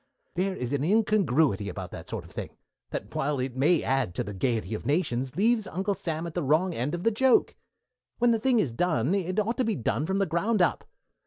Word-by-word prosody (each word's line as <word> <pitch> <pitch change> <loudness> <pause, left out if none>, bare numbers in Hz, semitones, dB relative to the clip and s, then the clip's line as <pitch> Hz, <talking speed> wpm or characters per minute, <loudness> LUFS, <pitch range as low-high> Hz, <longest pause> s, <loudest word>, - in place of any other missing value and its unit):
There 190 +1 0
is 125 -2 -4
an 140 -1 0
incongruity 160 - +2
about 95 -3 -6
that - - -9
sort - - -4
of - - -15
thing - - -7 0.3
that, - - -6
while 145 +1 0
it 125 -1 -3
may 150 +5 +3
add 130 -9 0
to - - -1
the 105 - -6
gaiety 110 0 -1
of 110 - -4
nations, 135 -3 -1
leaves 220 +1 +2
Uncle 195 +3 -1
Sam 165 -3 -3
at 170 - -6
the 175 - -1
wrong 160 +6 +2
end 135 +6 -2
of 175 - -6
the 230 - +3
joke. 255 +3 +3 0.6
When 240 0 +3
the 225 - +2
thing 255 +1 +2
is 150 - +1
done 155 0 +1
it 185 0 0
ought 220 +3 0
to - - +4
be 225 -2 0
done 135 +5 -1
from 190 - 0
the 195 - +2
ground 195 +7 0
up. 175 - +1
170 Hz, 230 wpm, -27 LUFS, 130-200 Hz, 0.6 s, to